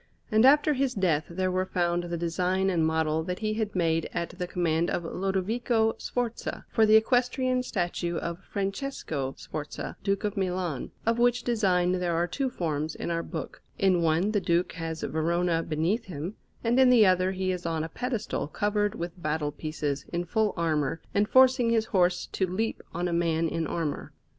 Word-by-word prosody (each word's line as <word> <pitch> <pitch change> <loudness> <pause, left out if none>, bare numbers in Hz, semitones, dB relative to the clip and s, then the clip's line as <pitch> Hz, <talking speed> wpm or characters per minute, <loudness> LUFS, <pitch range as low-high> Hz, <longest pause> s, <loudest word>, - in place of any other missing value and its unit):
And 220 +2 +5
after 295 +2 +6
his 265 -1 0
death 165 -6 +1
there 185 +2 -1
were 185 +1 0
found 175 -1 0
the 170 0 -3
design 180 +3 0
and 170 -3 +1
model 160 0 +1
that 180 0 -3
he 215 0 -1
had 215 -2 -2
made 165 -2 +1
at 170 - -2
the 180 0 -5
command 170 -2 0
of 175 - -1
Lodovico 220 +6 0
Sforza 240 -2 -3
for 220 -1 +4
the 215 - +6
equestrian 250 +2 +2
statue 175 -6 -2
of 170 +2 -4
Francesco 195 - -3
Sforza, 150 -1 -6
Duke 195 +1 0
of 210 0 -1
Milan, 180 -7 -2 0.2
of 230 +1 +1
which 245 0 +3
design 185 -7 +2
there 180 -2 0
are 170 +1 +2
two 265 +9 -2
forms 155 -6 -2
in - - -4
our 165 0 0
book; 165 -2 -7 0.2
in 185 -3 +3
one 165 +5 +2
the 205 -2 +1
Duke 175 0 +1
has 165 -1 -5
Verona 170 +1 +1
beneath 165 +9 -1
him, 170 +1 -5 0.3
and 240 +2 +2
in 260 -1 +7
the 235 -4 +7
other 185 0 +3
he 185 0 -1
is 180 -2 -3
on 160 -1 -1
a - - -3
pedestal 235 - -3
covered 205 +4 0
with 170 +1 -6
battle 150 -1 -1
pieces, 145 -2 -3
in 175 0 -2
full 215 +3 0
armour, 160 -2 0
and 205 +1 +2
forcing 260 -2 +5
his 225 -1 +2
horse 180 -4 +2
to 190 - -1
leap 215 +5 -2
on 175 +1 -2
a 175 - -2
man 165 -1 +1
in 165 0 -2
armour. 155 -3 -3
180 Hz, 185 wpm, -28 LUFS, 165-215 Hz, 0.3 s, in